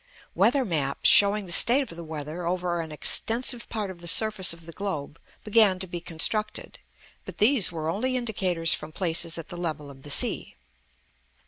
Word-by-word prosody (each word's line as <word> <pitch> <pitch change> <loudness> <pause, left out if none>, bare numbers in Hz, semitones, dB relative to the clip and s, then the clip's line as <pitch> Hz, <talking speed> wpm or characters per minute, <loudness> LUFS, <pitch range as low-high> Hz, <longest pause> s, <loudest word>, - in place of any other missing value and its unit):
Weather 275 -3 +2
maps, 145 -8 -1
showing 205 0 +6
the 175 - -7
state 250 +10 +6
of 205 -11 -11
the 170 - -9
weather 155 +2 -7
over 175 0 -3
an 160 -1 -9
extensive 235 - 0
part 210 -4 -4
of 175 -2 -14
the 170 - -10
surface 210 +1 +1
of 165 -1 -7
the 165 - -10
globe, 165 -6 -6 0.2
began 210 -3 +3
to 190 - -6
be 175 -1 -7
constructed; 210 +6 -3 0.4
but - - -11
these 220 -3 +4
were 160 -2 -6
only 250 +10 -2
indicators 185 -8 0
from 155 +1 -7
places 165 -1 0
at 165 - -9
the 175 - -9
level 155 -4 -5
of 135 -1 -16
the 145 - -11
sea. - - +1
175 Hz, 185 wpm, -25 LUFS, 165-210 Hz, 0.4 s, showing